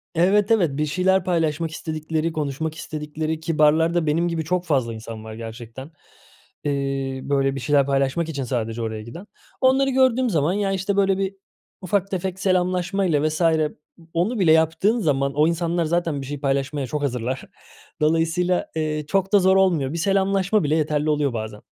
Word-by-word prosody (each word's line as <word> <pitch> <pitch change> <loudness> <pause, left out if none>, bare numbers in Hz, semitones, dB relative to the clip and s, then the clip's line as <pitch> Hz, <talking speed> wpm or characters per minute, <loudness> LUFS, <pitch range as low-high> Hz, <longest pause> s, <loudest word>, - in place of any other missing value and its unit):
Evet, 195 +5 +3
evet. 185 -9 +3
Bir 150 - +1
şeyler 185 +4 +2
paylaşmak 165 -2 0
istedikleri, 155 +1 -3
konuşmak 155 +1 -3
istedikleri 155 0 -4
ki 160 0 -3
barlarda 160 +3 +3
benim 160 +3 +1
gibi 165 -2 -2
çok 180 +3 -1
fazla 130 -8 0
insan 110 0 -8
var 110 0 -8
gerçekten. 115 +5 -9 0.7
Iıı, 135 -2 -2
böyle 135 -1 +1
bir - - -3
şeyler 140 +1 +2
paylaşmak 140 +4 0
için 140 -4 -3
sadece 115 -2 -3
oraya 110 -1 -4
giden. 165 - -10 0.4
Onları 265 +1 +4
gördüğüm 260 -1 +3
zaman 160 -2 +1
ya, 200 -1 0
işte, 195 +1 -1
böyle 195 -1 +3
bir 195 0 -2 0.5
ufak 195 +1 -1
tefek 190 0 -3
selamlaşmayla 185 -3 +1
vs. 155 +2 -3
ı 160 -2 +2 0.4
onu 205 +8 0
bile 175 -5 +4
yaptığın 160 +8 +3
zaman 140 -6 0
o 150 +2 +3
insanlar 170 0 0
zaten 165 -3 -1
bir - - -7
şey 145 +1 -5
paylaşmaya 140 0 -1
çok 150 +2 -3
hazırlar. 125 -1 -2 0.6
Dolayısıyla, 165 +3 +1
ııı, 155 -1 -2
çok 195 +5 -1
da 205 - +7
zor 190 0 +4
olmuyor, 165 -7 +2
bir - - -3
selamlaşma 195 +2 +1
bile 150 +1 +1
yeterli 150 -1 0
oluyor 145 -3 +1
bazen. 110 -2 -6
160 Hz, 170 wpm, -23 LUFS, 140-185 Hz, 0.7 s, da